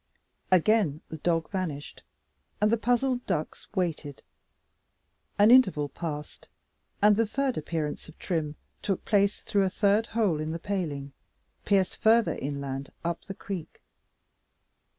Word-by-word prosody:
Again 185 -4 +3
the 160 - -7
dog 165 0 0
vanished, 165 -7 -4 0.6
and 210 +1 +3
the 230 - +3
puzzled 245 +2 +1
ducks 155 -5 -3
waited. 160 -6 -2 1.1
An 210 +3 +6
interval 190 - +5
passed, 150 0 -6 0.6
and 210 0 +7
the 225 +2 +2
third 265 +2 0
appearance 155 0 -3
of 160 - -15
Trim 155 -5 -2 0.3
took 195 -3 -2
place, 200 -1 +2
through 200 - +1
a 190 - +2
third 205 +3 +2
hole 210 -9 +1
in 155 +1 -3
the - - -2
paling, 160 -7 -3 0.5
pierced 195 -2 +2
further 225 +1 +4
inland 140 -1 -4
up 170 0 -2
the 195 - -7
creek. 190 -6 -7
185 Hz, 130 wpm, -28 LUFS, 150-210 Hz, 1.1 s, and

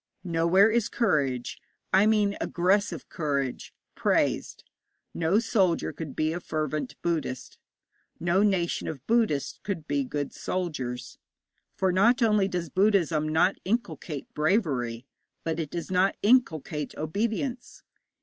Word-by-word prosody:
Nowhere 175 +4 +4
is 230 -1 +1
courage 140 - 0 0.3
I 195 +3 +6
mean 210 -2 +2
aggressive 180 -2 +1
courage 140 -5 -2 0.2
praised. - - 0 0.5
No 170 +4 +2
soldier 200 -7 +1
could 155 -5 -7
be 155 +1 0
a 175 - -3
fervent 155 - -3
Buddhist; 160 -7 -3 0.6
no 175 +3 +2
nation 190 -5 +1
of 140 -4 -6
Buddhists 220 - +1
could 185 -7 -4
be 140 -1 0
good 145 +1 -4
soldiers; 130 -9 -4 0.6
for 190 -1 +1
not 235 +7 +4
only 210 -3 +3
does 180 -3 -3
Buddhism 175 -6 +2
not 170 +5 +3
inculcate 185 - -3
bravery, 140 - 0 0.4
but 165 0 -2
it 155 -3 -3
does 170 +3 -5
not 185 +1 +2
inculcate 160 - +2
obedience. 230 - -3
170 Hz, 120 wpm, -27 LUFS, 150-205 Hz, 0.6 s, I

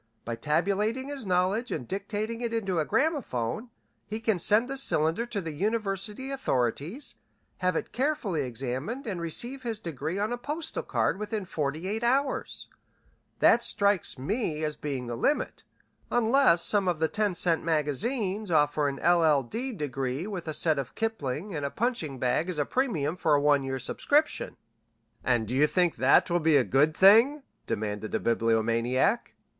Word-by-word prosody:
By 115 - -3
tabulating 200 - 0
his 275 -7 -5
knowledge 185 +6 +1
and 120 - -4
dictating 210 +4 -3
it 235 -1 -2
into 195 -6 -1
a 155 - 0
gramophone 245 - -1 0.4
he 215 +1 -4
can 220 -4 0
send 215 +7 +3
the 270 - -3
cylinder 175 - +1
to 210 -4 -3
the 165 -3 -5
university 210 - -2
authorities, 165 - -2 0.4
have 185 -1 +1
it - - -3
carefully 250 - -1
examined, 130 - -4
and 185 -6 -4
receive 240 - -1
his 230 -3 -3
degree 165 -2 -4
on 210 +4 -1
a 245 - -4
postal 300 +6 -4
card - - -1
within 210 -1 -3
forty 155 +1 -3
eight 215 +3 -2
hours. 265 +3 0 0.7
That 235 - +6
strikes 200 -8 +1
me 160 - -2
as 150 -1 -1
being 140 -4 -4
the 120 0 -4
limit, 285 - -1 0.4
unless 240 -6 +4
some 200 -3 +4
of 175 -3 +1
the 160 +1 +1
ten 205 +1 0
cent 170 -1 +2
magazines 190 - -1
offer 150 -2 +2
an 140 - -2
LL. 160 -5 +4
D. 240 - -4
degree 135 - -3
with 190 -5 -6
a 155 - -2
set 155 -3 +2
of 135 - -6
Kipling 195 - -3
and 150 -3 -3
a 140 - -1
punching 210 - -2
bag 130 +8 0
as 180 - -3
a 145 - +1
premium 180 - -1
for 155 -4 +3
a - - +3
one 145 -1 +3
year's 130 -1 -3
subscription." 295 - 0 0.7
"And 120 -3 0
you 140 +4 +4
think 175 0 +1
that 130 +1 +4
will 175 - +3
be 160 -2 +4
a 135 - +4
good 150 +5 +2
thing?" 230 +10 +6 0.2
demanded 105 0 -3
the - - 0
Bibliomaniac. 115 - +1
180 Hz, 170 wpm, -28 LUFS, 145-225 Hz, 0.7 s, That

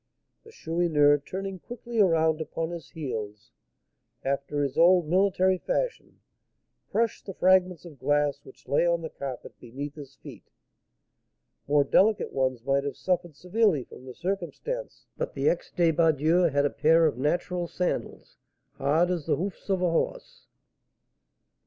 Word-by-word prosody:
The 450 - -15
Chourineur, 160 - +2
turning 190 +5 -6
quickly 240 +2 -6
around 160 -4 +3
upon 165 +1 -4
his 170 -3 -8
heels, 115 -6 -6 0.7
after 140 +1 -1
his 140 -1 -2
old 175 -1 +5
military 185 +1 +2
fashion, - - -3 0.7
crushed 230 -1 -1
the 195 - -6
fragments 185 -2 +3
of 155 -6 -12
glass 145 -1 +1
which - - -17
lay 145 - +2
on 170 -1 +1
the 160 - -5
carpet 135 -3 -7
beneath 140 +4 -7
his 140 -3 -11
feet. - - -13 1.2
More 145 0 +4
delicate 205 +9 +2
ones 130 -3 -1
might 140 0 +1
have 140 - -4
suffered 175 -4 -1
severely 180 - +1
from 125 - -14
the 125 - -9
circumstance, 195 - -4
but - - -3
the 140 +1 0
ex 175 - 0
débardeur 165 0 +3
had 145 +1 +2
a 145 - +1
pair 160 +2 +4
of 145 -6 0
natural 175 +4 -1
sandals, 180 +1 -4 0.4
hard 160 +6 +2
as 170 -5 -3
the - - +2
hoofs 195 +3 -5
of 190 -2 +1
a 175 - +2
horse. - - -3
165 Hz, 145 wpm, -27 LUFS, 145-185 Hz, 1.2 s, old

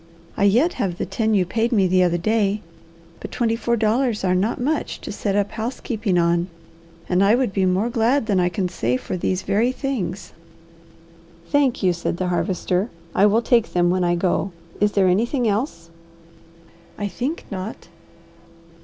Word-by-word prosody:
I 200 - +2
yet 245 - +3
have 180 -3 -1
the - - -2
ten 220 +3 0
you 185 -2 +3
paid 225 +6 0
me 205 -5 +3
the 185 0 +3
other 175 -1 +2
day, 210 +2 +1 0.6
but - - -8
twenty 230 -2 0
four 235 +1 0
dollars 225 +1 +1
are 185 -1 +2
not 195 +6 0
much 290 +6 -1
to - - -6
set 200 -2 -2
up 205 0 +1
housekeeping 220 -3 -2
on, 170 0 +2 0.6
and 180 +1 +2
I 205 +3 +5
would 250 -5 0
be 190 -2 +2
more 195 +6 +1
glad 235 +3 +2
than 200 -4 +1
I 180 0 +2
can 185 0 -1
say 125 -8 -1
for - - -5
these 185 +1 -1
very 230 +5 +1
things." 225 - -4 1.2
"Thank 275 -6 +2
you," 180 -1 +3
said 170 0 -3
the 185 0 -1
Harvester. 185 +2 -1 0.2
"I 200 - +5
will 220 +3 +2
take 235 -2 +2
them 175 0 +3
when 185 0 +1
I 175 0 +2
go. 185 +2 0 0.3
Is 205 0 +2
there 195 -2 +3
anything 235 +7 +1
else?" 200 - -2 1.1
"I 205 - -2
think 250 - -4
not." 195 +1 -6
200 Hz, 180 wpm, -22 LUFS, 180-230 Hz, 1.2 s, I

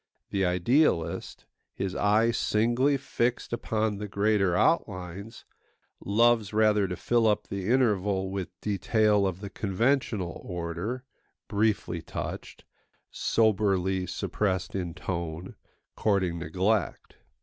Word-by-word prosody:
The 100 -1 0
idealist, 90 - +1 0.3
his 95 -1 -3
eye 105 +3 +3
singly 120 +6 +2
fixed 125 -3 -2
upon 110 -3 -1
the 105 - -4
greater 100 -2 +1
outlines, 100 - -1 0.6
loves 115 0 +3
rather 105 -2 +3
to 90 - -4
fill 115 +4 +2
up 105 -1 +1
the 100 +1 -3
interval 100 -6 +1
with 95 -2 -3
detail 105 0 +2
of 95 0 -4
the 100 -1 -7
conventional 110 - -1
order, 90 +8 -4 0.4
briefly 100 -5 0
touched, - - -6 0.5
soberly 95 -4 +1
suppressed 95 0 -2
in 90 -3 -3
tone, 85 -1 -5 0.4
courting 95 -5 +1
neglect. 95 +6 -1
100 Hz, 105 wpm, -28 LUFS, 90-110 Hz, 0.6 s, eye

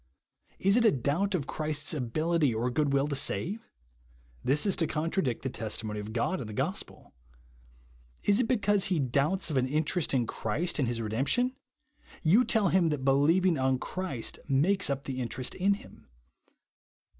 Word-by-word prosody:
Is 195 +4 +3
it 240 - +3
a 220 - +6
doubt 160 - 0
of 150 -6 -2
Christ's 155 0 -1
ability 150 +1 0
or 120 +3 -1
good 145 +2 +1
will 140 +1 +2
to 145 - -2
save? 190 +9 0 0.7
This 145 +7 +2
is 200 - +2
to 165 - +1
contradict 155 - -1
the 130 - -1
testimony 110 -1 -4
of 105 +1 -6
God 120 +11 -1
in 115 - -6
the 110 - -7
gospel. - - -3 1.1
Is 205 +2 +3
it 250 - +1
because 205 -5 +2
he 185 - 0
doubts 145 +7 0
of 140 - 0
an 130 0 +2
in 150 +4 +1
terest 170 +1 -1
in 125 -3 +2
Christ 140 +11 -2
and 135 - +1
his 115 -1 -2
redemption? 140 - 0 0.7
You 190 +10 +5
tell 220 -5 +2
him 175 -3 +3
that 145 -3 -3
believing 160 +5 +3
on 130 0 +2
Christ 175 -5 -4
makes 160 +7 +2
up 140 0 -2
the 130 -1 -4
interest 125 +1 -3
in 200 +2 +2
him. - - -15
150 Hz, 175 wpm, -29 LUFS, 130-185 Hz, 1.1 s, a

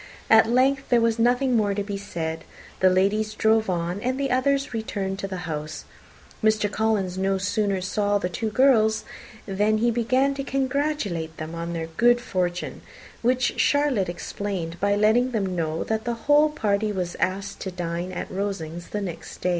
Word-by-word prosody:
At 225 0 +7
length 270 +3 +2
there 240 - +5
was 230 0 +1
nothing 245 +2 +3
more 205 -3 +2
to 205 - -1
be 200 0 -4
said; 165 -5 -4 0.4
the 185 - +5
ladies 210 +4 +1
drove 220 -1 +2
on, 175 +2 -2
and 255 +3 -1
the 275 -2 -1
others 275 +1 +1
returned 205 -4 -3
into 195 0 -4
the 185 -2 -5
house. 155 -1 -5 0.6
Mr. 215 -1 +2
Collins 205 -5 0
no 195 0 +1
sooner 195 0 0
saw 205 +2 +1
the 195 - -1
two 215 +5 -3
girls 220 -3 +3 0.4
than 210 +2 +1
he 235 +2 +2
began 255 +4 +2
to 275 0 -4
congratulate 265 - -1
them 155 +1 -6
on 170 +1 -4
their 165 -1 -3
good 240 +9 +3
fortune, 180 -6 -3 0.4
which 250 +1 +1
Charlotte 285 -10 +2
explained 175 -1 -4
by 200 0 +2
letting 225 +5 +3
them 195 -4 -1
know 160 -1 -1
that 220 0 -2
the 240 0 -1
whole 295 +1 +5
party 215 -7 0
was 180 -3 -3
asked 195 +2 -2
to 190 - -4
dine 175 0 -4
at 180 - -5
Rosings 175 -4 -4
the 210 - -3
next 180 -4 -7
day. 180 - +1
205 Hz, 180 wpm, -24 LUFS, 185-240 Hz, 0.6 s, At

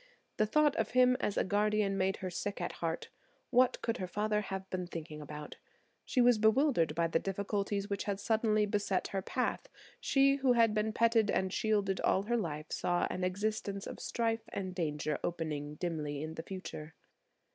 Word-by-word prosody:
The 215 - +3
thought 300 +4 +3
of - - 0
him 250 0 +6
as 205 - -1
a - - +3
guardian 205 0 +1
made 190 0 +1
her 185 - -3
sick 200 +4 -3
at 175 - -2
heart. 165 0 -2 0.4
What 255 0 +4
could 230 - 0
her 185 - -3
father 210 +2 0
have 190 -1 -5
been 180 -1 -2
thinking 155 -3 -7
about? 150 0 -8 0.5
She 255 - +2
was 240 -2 +5
bewildered 220 - +3
by 170 +1 +2
the 165 0 +1
difficulties 200 +1 -2
which 200 -1 -3
had 200 -1 -2
suddenly 215 0 +2
beset 205 -2 -1
her 195 - -2
path. 250 +6 -2 0.3
She 275 0 +3
who 265 -2 +3
had 230 -2 +4
been 215 +1 0
petted 225 -1 +3
and 190 0 0
shielded 205 -3 +1
all 190 - +2
her 240 +3 0
life 155 -7 -4
saw 175 0 +1
an 185 - -3
existence 200 +1 -2
of - - -7
strife 230 -1 -1
and 185 -2 -4
danger 150 -4 -2
opening 150 -3 -3
dimly 150 -4 -3
in 155 0 -5
the 160 - -5
future. 160 -4 -7
200 Hz, 185 wpm, -33 LUFS, 175-220 Hz, 0.5 s, him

